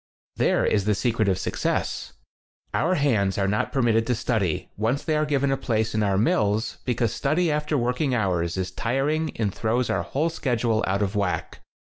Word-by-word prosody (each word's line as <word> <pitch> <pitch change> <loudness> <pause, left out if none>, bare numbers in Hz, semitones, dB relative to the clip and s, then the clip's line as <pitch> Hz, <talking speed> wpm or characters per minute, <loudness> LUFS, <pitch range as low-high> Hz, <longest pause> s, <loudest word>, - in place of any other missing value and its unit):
There - - +2
is 100 -2 +1
the 105 -1 +2
secret 110 -2 +1
of 95 - +1
success. - - -2 0.6
Our 180 +4 +2
hands 110 - +1
are 100 -1 +1
not 105 +2 0
permitted 115 -4 +2
to 125 - +1
study, 105 -7 -1
once 115 +7 0
they 155 - 0
are 150 0 +1
given 140 -1 +1
a 135 - +1
place 110 -4 -1
in 110 - +1
8 - - +2
our 95 -1 +1
mills, 105 +1 +1
because 120 -2 0
study 155 +6 +1
after 150 0 0
work 125 +1 -1
ing 135 -5 +1
hours 90 -5 0
is 95 -1 -2
tiring 140 - 0
and 105 -4 0
throws 115 +3 0
our - - +1
whole 155 +5 -1
schedule 115 -6 0
out 100 +2 +1
of 100 +1 -2
whack. 100 -3 -2
115 Hz, 195 wpm, -25 LUFS, 105-135 Hz, 0.6 s, There